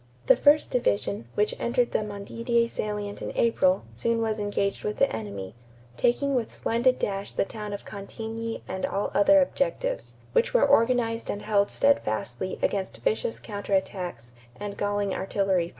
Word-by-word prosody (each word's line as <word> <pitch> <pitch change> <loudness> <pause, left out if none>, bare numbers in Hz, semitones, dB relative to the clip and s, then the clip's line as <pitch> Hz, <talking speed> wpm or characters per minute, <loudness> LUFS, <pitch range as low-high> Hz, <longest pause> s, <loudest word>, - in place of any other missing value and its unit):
The - - +7
first 295 +1 +4
division, 105 - 0
which 210 +1 +2
entered 240 0 +1
the - - +1
Montdidier 230 +3 -1
salient 210 -2 -4
in - - -4
April, 190 -5 +3
soon 230 - 0
was 220 -1 0
engaged 205 -1 -1
with 210 - -2
the - - +2
enemy, 100 -3 -6 0.4
"taking 275 - +2
with 245 -4 0
splendid 245 +3 +1
dash 195 0 -3
the - - +2
town 210 0 -6
of 200 - -6
Cantigny 225 +3 -6
and 190 - -4
all 200 +1 -1
other 290 +9 +6
objectives, - - -2 0.2
which 480 0 +2
were - - +6
organized 230 -1 +2
and 205 - -3
held 205 -1 +2
steadfastly 155 - 0
against 195 -2 -1
vicious 220 +1 -1
counter 205 -1 -2
attacks 180 - -3 0.3
and 205 -1 -5
galling 205 -1 -1
artillery 190 -3 0
fire." - - -11
210 Hz, 160 wpm, -27 LUFS, 195-235 Hz, 0.4 s, The